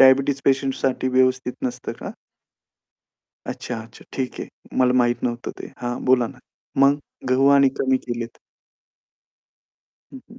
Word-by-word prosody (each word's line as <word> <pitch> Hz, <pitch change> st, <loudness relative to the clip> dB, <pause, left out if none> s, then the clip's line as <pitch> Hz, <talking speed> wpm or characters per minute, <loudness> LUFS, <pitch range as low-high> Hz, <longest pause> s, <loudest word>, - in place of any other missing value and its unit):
Diabetes 135 Hz, +1 st, +6 dB
पेशंटसाठी 135 Hz, -1 st, +1 dB
व्यवस्थित 130 Hz, 0 st, +2 dB
नसतं 125 Hz, -, -3 dB
का? -, -, -5 dB, 1.4 s
अच्छा, 125 Hz, -, -4 dB
अच्छा. 115 Hz, +1 st, -13 dB
ठीक 130 Hz, -1 st, -3 dB
आहे. -, -, -5 dB, 0.3 s
मला 125 Hz, -1 st, +5 dB
माहीत 120 Hz, -1 st, +2 dB
नव्हतं 120 Hz, -1 st, -2 dB
ते. -, -, -8 dB
हां, 120 Hz, 0 st, -3 dB
बोला 125 Hz, -2 st, +4 dB
ना. -, -, -11 dB, 0.4 s
मग 140 Hz, +1 st, +5 dB, 0.3 s
गहू 130 Hz, +2 st, +4 dB
आणि 140 Hz, -1 st, +6 dB
कमी 130 Hz, 0 st, +3 dB
केलेत. 120 Hz, -1 st, -4 dB, 1.7 s
हं, 270 Hz, -, -8 dB
हं. 235 Hz, -, -13 dB
130 Hz, 135 wpm, -23 LUFS, 120-135 Hz, 1.7 s, Diabetes